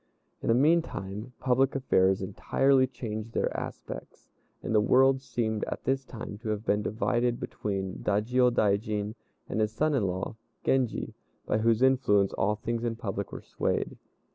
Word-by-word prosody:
In -, -, -4 dB
the 115 Hz, -, +4 dB
meantime, 125 Hz, -, +1 dB
public 130 Hz, +1 st, +2 dB
affairs 95 Hz, -7 st, +2 dB
entirely 130 Hz, +5 st, +2 dB
changed 115 Hz, -3 st, -6 dB
their -, -, 0 dB
aspects, -, -, -7 dB, 0.3 s
and -, -, -2 dB
the 105 Hz, -, +5 dB
world 130 Hz, +4 st, +4 dB
seemed 115 Hz, -4 st, -2 dB
at -, -, -5 dB
this 135 Hz, +1 st, 0 dB
time 110 Hz, -5 st, -8 dB
to 115 Hz, -1 st, -5 dB
have 105 Hz, +1 st, -2 dB
been 105 Hz, 0 st, +2 dB
divided 120 Hz, +3 st, 0 dB
between 95 Hz, -2 st, -4 dB
the -, -, -1 dB
Dajiôdaijin 105 Hz, -2 st, +2 dB, 0.3 s
and 110 Hz, -, -1 dB
his 110 Hz, 0 st, +1 dB
son 150 Hz, +7 st, +1 dB
in 115 Hz, -8 st, +2 dB
law, 95 Hz, +4 st, -3 dB, 0.3 s
Genji, 130 Hz, -3 st, +1 dB, 0.3 s
by 105 Hz, -, +1 dB
whose 115 Hz, +2 st, +3 dB
influence 125 Hz, -7 st, +3 dB
all 105 Hz, +2 st, +1 dB
things 115 Hz, +2 st, -3 dB
in 115 Hz, -1 st, -1 dB
public 100 Hz, -3 st, -4 dB
were -, -, -7 dB
swayed. -, -, -2 dB
115 Hz, 160 wpm, -28 LUFS, 105-130 Hz, 0.3 s, the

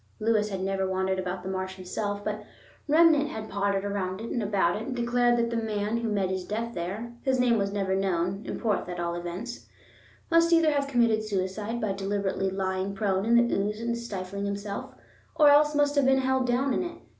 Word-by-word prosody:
Lewis 215 Hz, -1 st, +2 dB
had 190 Hz, -2 st, -4 dB
never 190 Hz, 0 st, -1 dB
wandered 190 Hz, 0 st, 0 dB
about 185 Hz, 0 st, -4 dB
the -, -, -6 dB
marsh 190 Hz, 0 st, -3 dB
himself; 205 Hz, +2 st, -4 dB
but 210 Hz, 0 st, -3 dB, 0.4 s
Remnant 305 Hz, -1 st, +5 dB
had 220 Hz, 0 st, -6 dB
pottered 200 Hz, 0 st, 0 dB
round 195 Hz, -2 st, -2 dB
it 225 Hz, -, -6 dB
and 240 Hz, -, -1 dB
about 200 Hz, -4 st, +1 dB
it, 210 Hz, -, -4 dB
and 260 Hz, -, -3 dB
declared 240 Hz, 0 st, +2 dB
that 235 Hz, 0 st, 0 dB
the -, -, -2 dB
man 210 Hz, 0 st, -1 dB
who 230 Hz, -1 st, -2 dB
met 195 Hz, -3 st, 0 dB
his 190 Hz, -1 st, -2 dB
death 230 Hz, +4 st, -3 dB
there—his 235 Hz, +9 st, -3 dB
name 240 Hz, -3 st, +3 dB
was 200 Hz, 0 st, -1 dB
never 195 Hz, -2 st, -1 dB
known, 190 Hz, 0 st, 0 dB
in -, -, -5 dB
Porth 210 Hz, -5 st, -1 dB
at 175 Hz, 0 st, -5 dB
all 170 Hz, 0 st, -1 dB
events—must 240 Hz, -, -3 dB
either 330 Hz, -2 st, +5 dB
have 285 Hz, -1 st, 0 dB
committed 235 Hz, -5 st, +2 dB
suicide 210 Hz, +3 st, -2 dB
by 215 Hz, -3 st, -1 dB
deliberately 195 Hz, 0 st, -1 dB
lying 190 Hz, 0 st, -2 dB
prone 195 Hz, -2 st, 0 dB
in 235 Hz, -, +4 dB
the -, -, -2 dB
ooze 210 Hz, +2 st, -1 dB
and 235 Hz, +1 st, -1 dB
stifling 200 Hz, -4 st, -5 dB
himself, 200 Hz, 0 st, -5 dB, 0.4 s
or 300 Hz, -2 st, +6 dB
else 295 Hz, +1 st, +5 dB
must 290 Hz, 0 st, +3 dB
have 285 Hz, -2 st, +3 dB
been 265 Hz, 0 st, +4 dB
held 260 Hz, -1 st, +1 dB
down 255 Hz, +2 st, +1 dB
in -, -, 0 dB
it. 345 Hz, -1 st, -5 dB
210 Hz, 205 wpm, -27 LUFS, 190-240 Hz, 0.4 s, or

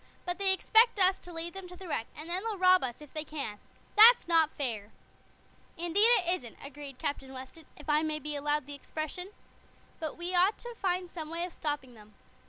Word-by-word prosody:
But 355 Hz, 0 st, -3 dB
they 390 Hz, -1 st, +4 dB
expect 445 Hz, +3 st, +4 dB
us 375 Hz, 0 st, +5 dB
to 355 Hz, -, -11 dB
lead 335 Hz, 0 st, -4 dB
them 385 Hz, -1 st, -8 dB
to 360 Hz, -, -11 dB
the 375 Hz, 0 st, -10 dB
wreck, 230 Hz, -8 st, -2 dB
and 310 Hz, -, -8 dB
then 355 Hz, +2 st, -2 dB
they'll 445 Hz, -3 st, -3 dB
rob 370 Hz, -2 st, +5 dB
us 250 Hz, +2 st, -4 dB
if 295 Hz, -, -16 dB
they 310 Hz, -, -2 dB
can. 280 Hz, -9 st, -6 dB, 0.4 s
That's 455 Hz, +1 st, +8 dB
not 325 Hz, -3 st, +4 dB
fair." 225 Hz, -7 st, -3 dB, 0.9 s
"Indeed, 345 Hz, +7 st, +3 dB, 0.2 s
it 350 Hz, -, +2 dB
isn't," 235 Hz, -7 st, -13 dB
agreed 280 Hz, -1 st, -9 dB
Captain 285 Hz, -3 st, -4 dB
Weston, 265 Hz, +5 st, -10 dB
"if 295 Hz, -, -13 dB
I 300 Hz, 0 st, +3 dB
may 310 Hz, -1 st, -1 dB
be 300 Hz, 0 st, -5 dB
allowed 295 Hz, 0 st, -1 dB
the 290 Hz, -, -7 dB
expression. 310 Hz, +5 st, -6 dB, 0.9 s
We 350 Hz, +1 st, -4 dB
ought 365 Hz, +4 st, +3 dB
to 480 Hz, 0 st, -7 dB
find 365 Hz, -4 st, -1 dB
some 315 Hz, -3 st, -7 dB
way 335 Hz, +2 st, -3 dB
of 360 Hz, -, -9 dB
stopping 290 Hz, -5 st, -4 dB
them. 210 Hz, -2 st, -17 dB
325 Hz, 205 wpm, -30 LUFS, 285-365 Hz, 0.9 s, That's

